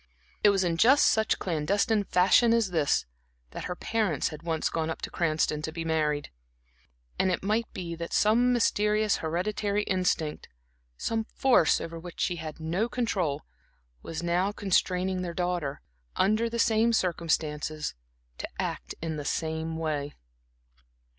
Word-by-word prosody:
It 210 - +8
was 195 -2 +2
in 170 -2 0
just 260 - +6
such 220 0 +3
clandestine 200 +6 +1
fashion 200 +6 +4
as 225 -5 +1
this 155 -4 +1 0.5
that - - -6
her 180 - -3
parents 205 -8 0
had 155 -1 -9
once 165 -2 -1
gone 160 -1 -1
up 160 - -4
to - - -4
Cranston 155 -2 0
to 160 - -4
be 165 0 -5
married; 150 -2 0 0.9
and 190 - +3
it 175 - -2
might 220 +3 0
be 170 -2 -5
that 170 0 -6
some 235 +4 +4
mysterious 215 -3 +2
hereditary 200 +5 -1
instinct, 180 -6 -1 0.5
some 225 -1 -1
force 245 -9 +3
over 165 0 -6
which 175 +1 -10
she 175 - 0
had 155 -1 -7
no 175 +9 -1
control, 185 - -1 0.6
was 165 - -5
now 175 +3 +1
constraining 185 -2 0
their 170 -2 -4
daughter, 175 -5 -2 0.3
under 215 +4 +2
the 235 - -4
same 230 0 +3
circumstances, 155 -5 -1 0.5
to - - -4
act - - -3
in 160 -2 -3
the 145 - -4
same 160 +2 -2
way. 150 -3 -3
175 Hz, 150 wpm, -28 LUFS, 160-210 Hz, 0.9 s, It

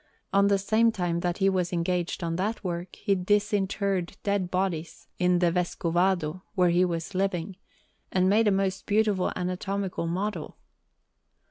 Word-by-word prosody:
At 200 0 +5
the 200 - +4
same 220 +4 +3
time 175 -5 -1
that 175 0 -1
he 195 - +2
was 185 -2 +1
engaged 175 0 -1
on 165 0 -1
that 210 +5 -2
work, 175 -1 -4
he 200 -1 0
disinterred 200 -1 0
dead 200 -3 0
bodies 175 -3 -2
in 180 0 +3
the 175 -1 +3
Vescovado, 175 -1 0
where 180 -3 +4
he 175 +1 +4
was 170 +1 -2
living, 185 -1 -1 0.6
and 185 0 +2
made 215 +3 +4
a - - +5
most 195 -1 -1
beautiful 205 -3 +2
anatomical 185 0 -2
model. 195 +5 -3
185 Hz, 150 wpm, -27 LUFS, 175-200 Hz, 0.6 s, At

